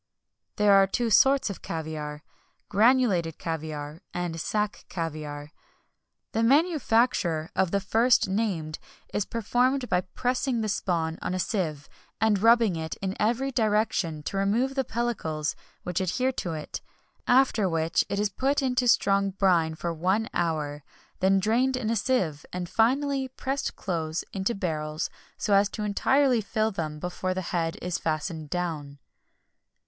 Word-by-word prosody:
[XXI - - -56
41] 210 - +1
There 205 - +7
are 195 0 +6
two 235 +4 0
sorts 270 +4 +5
of 195 - -9
caviar: 150 -2 -5 0.5
granulated 210 -7 +3
caviar, 155 -1 -5
and 175 -2 -3
sack 210 +2 -2
caviar. 150 -3 -5 0.8
The 225 - 0
manufacture 230 - +2
of 190 -1 +2
the 200 - +1
first 225 +5 +3
named 190 -7 -2 0.3
is 205 - 0
performed 245 +3 0
by 180 0 +2
pressing 250 +5 -1
the 215 - -1
spawn 165 -4 -1
on 185 - -2
a - - -2
sieve, 160 -8 -2 0.3
and 210 -3 +2
rubbing 230 -4 +5
it 160 -1 -4
in 190 0 -4
every 240 +5 +1
direction 210 - 0
to 170 +7 -3
remove 225 +7 +1
the 270 -1 0
pellicles 215 - -2 0.3
which 180 0 -2
adhere 250 +8 0
to 175 -9 -4
it, 155 -1 -6 0.5
after 245 -6 +4
which 165 0 +1
it 200 - -1
is 210 0 +1
put 275 +7 0
into 250 -1 +1
strong 200 -3 +3
brine 180 -5 +2
for 170 +1 -3
one 190 +7 0
hour, 150 -4 -1 0.4
then 195 +1 +4
drained 245 +6 +2
in 225 -3 -1
a - - +1
sieve, 190 - 0
and, 180 -1 -4
finally, 270 +6 +1
pressed 270 +2 -3
close 165 -3 -2
into 195 +4 -1
barrels, 155 -5 -3 0.3
so 210 - 0
as 200 0 +5
to 210 - -5
entirely 250 +4 +2
fill 215 +2 0
them 155 -6 -4
before 180 +3 -3
the 185 - -1
head 165 +1 0
is 180 -1 -2
fastened 155 -1 -3
down. 155 -5 -3
195 Hz, 155 wpm, -27 LUFS, 165-230 Hz, 0.8 s, There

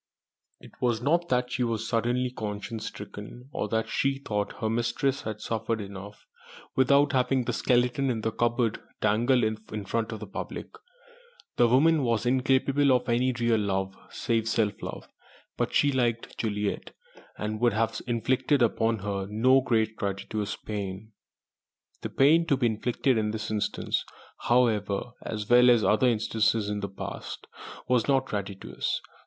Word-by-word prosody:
It - - -14
was 120 -3 +1
not 170 +7 +1
that 125 0 +1
she 125 - 0
was 115 -1 -2
suddenly 120 +2 0
conscience 110 0 -5
stricken, 105 +5 -9
or 105 - -2
that 110 0 0
she 135 0 0
thought 105 -6 -3
her 110 - -3
mistress 120 +4 0
had 110 -1 -5
suffered 115 0 -2
enough 100 0 -9 0.5
without 140 +2 +4
having 130 0 +2
the - - -1
skeleton 125 +2 +2
in 115 -3 -1
the 110 - -1
cupboard 120 0 0 0.2
dangled 120 +4 +3
in 110 -1 -3
front 115 +2 -1
of 110 - -5
the 105 - -6
public. 100 - -6 0.9
The 120 - +5
woman 150 +6 +4
was 115 -3 0
incapable 135 +2 +3
of 125 -1 +2
any 125 +2 +2
real 120 -2 +1
love 95 -1 -1
save 115 -1 -1
self 110 -3 0
love, - - -7 0.5
but - - -1
she 145 - +3
liked 120 -3 -1
Juliet, 105 -2 -3 0.4
and 105 0 -3
would 120 -2 +3
have 115 +1 0
inflicted 125 +3 +2
upon 115 0 +1
her 100 -1 -2
no 130 +5 +4
great 110 -3 0
gratuitous 100 +1 -3
pain. 105 0 -6 0.9
The - - -4
pain 160 +5 +4
to 140 - +3
be 130 - +1
inflicted 120 +2 +1
in 105 -1 0
this 110 0 -4
instance, 105 -1 -1 0.4
however 115 -3 +1
(as 105 -2 -5
well 125 +1 +6
as 120 -3 +5
other 110 +6 +3
instances 110 -2 +1
in 105 0 -2
the 100 0 -4
past), 95 - -7 0.4
was 125 -2 +2
not 135 -2 +3
gratuitous. 100 -4 -3
115 Hz, 155 wpm, -27 LUFS, 105-125 Hz, 0.9 s, well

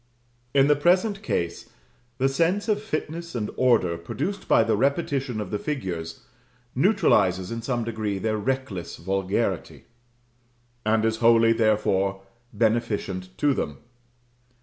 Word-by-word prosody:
In 135 -1 +6
the 145 +1 +4
present 185 +7 +2
case, 85 - -3 0.5
the 135 0 +2
sense 170 +10 +1
of 210 -2 +1
fitness 170 -5 -4
and 105 -3 -2
order, 110 -10 +2
produced 150 - -4
by - - +5
the 110 -1 +1
repetition 135 -1 0
of 105 -3 -5
the 105 - -1
figures, 90 - -4 0.5
neutralizes, 105 - +2
in 115 0 -4
some 120 0 -1
degree, 110 -3 -3
their 110 +2 -1
reckless 125 -6 -3
vulgarity; 95 +2 -2 1.0
and 110 +1 +2
is 110 0 +1
wholly, 115 0 +5
therefore, 100 -3 +1 0.3
beneficent 105 -5 -1
to 145 -1 +2
them. - - -3
115 Hz, 125 wpm, -25 LUFS, 100-140 Hz, 1.0 s, In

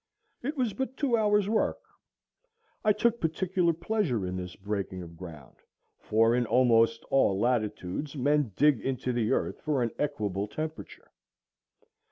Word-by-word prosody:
It 285 +5 -4
was 245 -6 0
but 265 -1 -4
two 270 -5 +2
hours' 210 -2 +2
work. 220 +1 +1 1.1
I 215 - +5
took 230 +3 +1
particular 175 +2 +1
pleasure 165 - -1
in 90 0 -3
this 90 -1 -6
breaking 100 -2 -4
of 85 -1 -11
ground, 80 -7 -11 0.4
for 115 +2 +3
in 120 -1 +1
almost 115 -2 +3
all 100 -8 +3
latitudes 115 - -1
men 145 -2 +1
dig 145 -1 +4
into 130 -1 -2
the 115 -2 0
earth - - -1
for 145 -5 0
an 115 - -1
equable 105 -9 -1
temperature. 155 +7 -7
130 Hz, 145 wpm, -29 LUFS, -, 1.1 s, I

